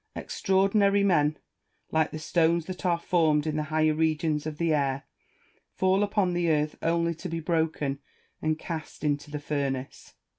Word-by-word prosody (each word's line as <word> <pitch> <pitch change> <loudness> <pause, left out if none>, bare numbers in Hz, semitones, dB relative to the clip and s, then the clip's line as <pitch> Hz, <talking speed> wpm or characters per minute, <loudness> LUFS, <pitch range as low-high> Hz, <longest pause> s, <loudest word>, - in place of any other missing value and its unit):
Extraordinary 200 +1 +2
men, 155 -6 +3 0.5
like 160 0 +2
the - - -6
stones 165 +1 +1
that 185 0 -4
are 170 -1 +3
formed 160 -3 +2
in 155 -1 -1
the 155 - 0
higher 155 0 +2
regions 155 -1 0
of 155 -1 -5
the 165 -1 +1
air, 140 -2 0 0.7
fall 190 +1 +2
upon 205 -3 +1
the 175 -1 +1
earth 150 -1 +1
only 170 0 +1
to 180 +3 -7
be 165 0 -3
broken 160 -4 -1 0.4
and 155 0 0
cast 160 -2 -7
into 145 -1 -1
the 150 - -4
furnace. 140 -3 -4
160 Hz, 160 wpm, -27 LUFS, 150-175 Hz, 0.7 s, men